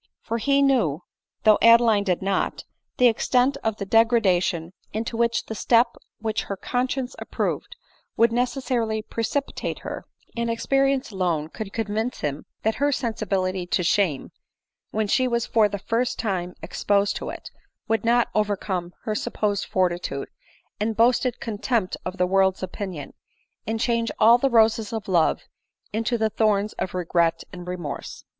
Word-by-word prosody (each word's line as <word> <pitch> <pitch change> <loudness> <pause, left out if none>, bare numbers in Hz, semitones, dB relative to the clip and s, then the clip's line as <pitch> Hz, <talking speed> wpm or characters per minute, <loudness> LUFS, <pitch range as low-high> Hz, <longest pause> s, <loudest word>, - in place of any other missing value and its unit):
For 230 - -2
he 280 +4 +3
knew, 205 - +2 0.4
though 215 -1 +6
Adeline 230 -3 +6
did 185 -2 0
not, 195 0 -1 0.3
the 250 - +4
extent 250 +3 +2
of 220 -1 0
the 200 - -4
degradation 190 -6 +2 0.2
into 225 +2 -3
which 235 0 +1
the - - -5
step 235 +2 +3 0.3
which 220 -1 -2
her 200 - -4
conscience 255 +3 -2
approved - - -3 0.4
would 230 0 +4
necessarily 245 -3 -1
pre 230 - -4
cipitate 280 +4 -2
her; - - -6 0.3
and 235 0 -1
experience 270 +3 +1
alone 170 -6 -1
could 215 +2 -7
convince 220 +3 -2
him 145 0 -3 0.2
that 220 - +2
her 290 0 +3
sensibility 195 -8 -1
to 180 - 0
shame, 170 -5 +1 0.6
when 215 0 -1
she 255 +5 +2
was 235 -2 0
for 220 -2 +3
the 205 - -3
first 230 +5 -1
time 180 -5 -2
exposed 200 0 +1
to - - -5
it, - - -8 0.4
would 225 -2 +1
not 235 +1 +3
overcome 195 -4 -1
her 215 - -2
supposed 205 -1 -1
fortitude 175 -6 -1 0.5
and 215 +1 -1
boasted 245 +1 +3
contempt 220 -2 -1
of 185 +1 -4
the 180 - +3
world's 190 0 +2
opinion, 185 -6 -6 0.5
and 225 0 -1
change 230 0 +1
all 230 +3 +6
the 275 - +2
roses 225 -2 +3
of 220 -2 -4
love 175 -4 +2 0.5
into 225 +2 0
the 220 -1 0
thorns 210 -1 +1
of 185 - -3
regret 170 -2 +1
and 180 -1 -8
remorse. 180 -4 -6
220 Hz, 155 wpm, -24 LUFS, 185-235 Hz, 0.6 s, though